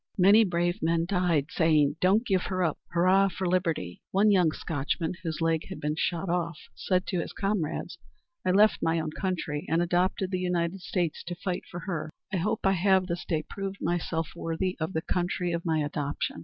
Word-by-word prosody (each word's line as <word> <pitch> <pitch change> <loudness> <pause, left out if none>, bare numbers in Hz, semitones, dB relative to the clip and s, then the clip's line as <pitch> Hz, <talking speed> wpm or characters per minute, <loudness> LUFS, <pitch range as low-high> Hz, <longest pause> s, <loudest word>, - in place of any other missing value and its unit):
Many 200 +4 +7
brave 175 +1 0
men 165 0 +1
died, 175 -6 +1
saying, 155 -3 +3
"Don't 200 +6 +4
give 190 -4 +2
her 185 -1 -1
up! 160 -3 0
Hurrah 185 +3 +4
for 185 0 -3
liberty!" 165 - -1
One 205 +2 +4
young 180 -5 +4
Scotchman, 160 +2 -2
whose 165 -2 -4
leg 165 -1 +1
had 190 - -7
been 150 +1 -1
shot 170 +3 -1
off, 170 -2 -1 0.2
said 185 -1 0
to 180 - -1
his - - -4
comrades, 195 -6 -2 0.4
"I 185 - 0
left 205 +4 +4
my 165 0 +1
own 155 -1 -3
country 160 -4 -2
and 165 - +2
adopted 180 +2 +1
the 185 - 0
United 180 0 -1
States 175 -2 -2
to 175 0 -4
fight 180 +1 -3
for 175 - -6
her. 170 -4 -3 0.2
I - - +2
hope 215 +6 -1
I 195 - +5
have 190 0 +3
this 175 -1 -4
day 155 -2 -1
proved 195 0 -5
myself 165 -2 -1
worthy 170 +2 -2
of 160 +4 -2
the 160 - -1
country 180 0 -1
of 170 +1 -3
my 160 -2 +1
adoption. 145 - -2
175 Hz, 195 wpm, -28 LUFS, 165-190 Hz, 0.4 s, Many